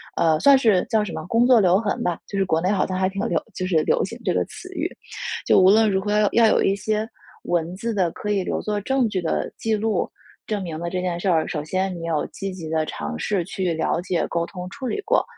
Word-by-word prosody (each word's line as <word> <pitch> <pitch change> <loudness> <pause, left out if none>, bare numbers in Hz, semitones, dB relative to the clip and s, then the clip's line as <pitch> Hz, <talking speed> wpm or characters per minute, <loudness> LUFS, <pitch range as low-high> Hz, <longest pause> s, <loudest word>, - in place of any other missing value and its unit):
呃， 160 -2 +3
算 280 -1 +7
是 220 -8 +3
叫 220 -2 +2
什 205 - -5
么 - - -6
“工 230 +5 +3
作 250 -2 +6
留 185 -2 +4
痕” 210 -1 -1
吧。 175 -2 0
就 200 - -4
是 195 - +2
国 160 -3 +1
内 180 - +1
好 200 - +1
像 185 - -2
还 185 0 +1
挺 195 +1 -4
流 - - 0 0.2
就 185 - -3
是 165 -4 +2
流 - - +2
行 - - -8
这 - - +1
个 - - +1
词 - - -11
语。 - - -2 0.6
就 - - +5
无 185 0 +6
论 215 +1 +5
如 190 - +2
何 205 - -4
要 210 -1 +3
要 230 -1 +5
有 - - +3
一 195 - +2
些 215 +2 -1 0.4
文 175 0 -1
字 230 +4 -3
的， 185 -4 +1
可 210 +4 -4
以 195 -2 +1
留 - - -2
作 210 -1 -2
证 265 +2 +1
据 195 -4 -2
的 165 - -2
记 225 -1 0
录， 215 -3 0 0.4
证 210 -3 -2
明 160 -3 -5
了 170 +1 -3
这 180 +1 -2
件 175 -2 -2
事 190 - 0
儿。 160 -3 +2
首 150 - -3
先 185 +4 -1
你 165 -1 -6
有 160 -3 0
积 195 0 -5
极 180 -4 -7
地 160 -1 +1
尝 75 +1 -5
试 190 - 0
去 185 -1 -2
了 160 - 0
解、 180 -2 -1
沟 170 0 -1
通、 180 -2 -7
处 260 +2 -6
理 415 - -2
过。 455 +4 +2
190 Hz, 290 characters per minute, -23 LUFS, 175-215 Hz, 0.6 s, 算